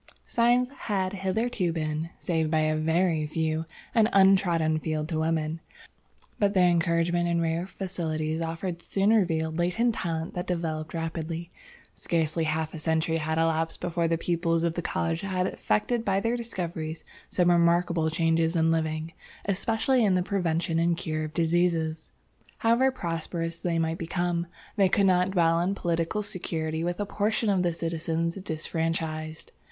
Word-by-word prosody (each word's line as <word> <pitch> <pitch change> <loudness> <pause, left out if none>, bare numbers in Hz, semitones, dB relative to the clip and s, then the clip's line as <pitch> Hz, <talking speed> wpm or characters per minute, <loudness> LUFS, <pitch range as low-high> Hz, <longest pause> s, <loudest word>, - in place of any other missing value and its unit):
"Science 245 +1 +3 0.2
had 190 -2 0
hitherto 195 0 0
been, 155 0 -2
save 160 -3 0
by 155 0 +2
a 155 0 +1
very 160 0 +1
few, 160 +1 -1 0.3
an 225 -2 +4
untrodden 180 -5 +4
field 155 -1 -2
to 160 -2 -2
women, 160 0 0 0.8
but 205 0 +2
the - - +4
encouragement 175 0 +2
and 170 0 +1
rare 165 +2 -1
facilities 160 -5 -3
offered 165 +2 -3
soon 200 +4 +2
revealed 165 -6 +1
latent 220 +8 +2
talent 165 -4 -3
that 180 - -4
developed 160 -3 -3
rapidly. 165 +1 -4 0.4
Scarcely 160 -1 0
half 155 0 -1
a 160 - -6
century 160 +1 +1
had 160 0 -1
elapsed 165 0 +1
before 170 -1 0
the 165 0 +1
pupils 165 -1 0
of 170 -1 +1
the 175 - -3
college 165 0 -1
had 185 -2 -1
effected 225 +4 0
by 195 -3 +1
their 230 +3 0
discoveries 170 -9 -4 0.3
some 175 -1 +3
remarkable 170 -1 +3
changes 165 +1 +1
in 165 0 +3
living, 160 0 -1 0.3
especially 225 +6 +1
in 195 -3 +3
the 180 - +2
prevention 170 -3 0
and 170 0 +2
cure 155 -3 -2
of 155 - -8
diseases. 165 -1 +1 0.5
"However 235 +3 +3
prosperous 165 -5 -4
they 170 -2 0
might 165 0 -1
become, 175 0 -1 0.3
they 195 -2 +4
could 200 +2 +3
not 180 -1 +3
dwell 170 -3 +3
in 185 +3 0
political 170 +3 -1
security 165 -5 -3
with 175 +2 -2
a 205 - 0
portion 210 +2 0
of 190 -2 +2
the 175 -1 +1
citizens 165 0 -2
disfranchised. 160 -2 -3
170 Hz, 155 wpm, -27 LUFS, 160-185 Hz, 0.8 s, an